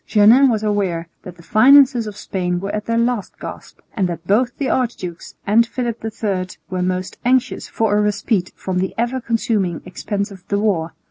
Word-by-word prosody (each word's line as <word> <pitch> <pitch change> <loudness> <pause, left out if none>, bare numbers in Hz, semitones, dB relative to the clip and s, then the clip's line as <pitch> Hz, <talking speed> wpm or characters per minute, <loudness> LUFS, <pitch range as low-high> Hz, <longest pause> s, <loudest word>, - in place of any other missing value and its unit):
Jeannin 230 +6 +6
was 220 -3 0
aware 190 -6 -1
that 180 - -10
the 170 - -15
finances 255 - +5
of 210 -1 -7
Spain 180 -3 -2
were 195 +2 -4
at 210 0 -3
their 230 0 +1
last 235 -3 -1
gasp, - - -9 0.2
and 190 -5 0
that 170 0 -6
both 235 +6 +1
the 280 - -1
archdukes 225 -11 -3
and 225 +3 +4
Philip 240 -3 -4
III 205 -4 -2 0.2
were 185 -1 -1
most 185 0 -2
anxious 255 0 +1
for 220 -2 0
a 210 - +3
respite 210 -2 0
from 185 -1 -3
the 190 0 -2
ever 240 +3 -1
consuming 215 -7 -1
expense 200 +3 -4
of 190 -2 -12
the 200 - 0
war. 185 -6 0
210 Hz, 190 wpm, -19 LUFS, 185-235 Hz, 0.2 s, Jeannin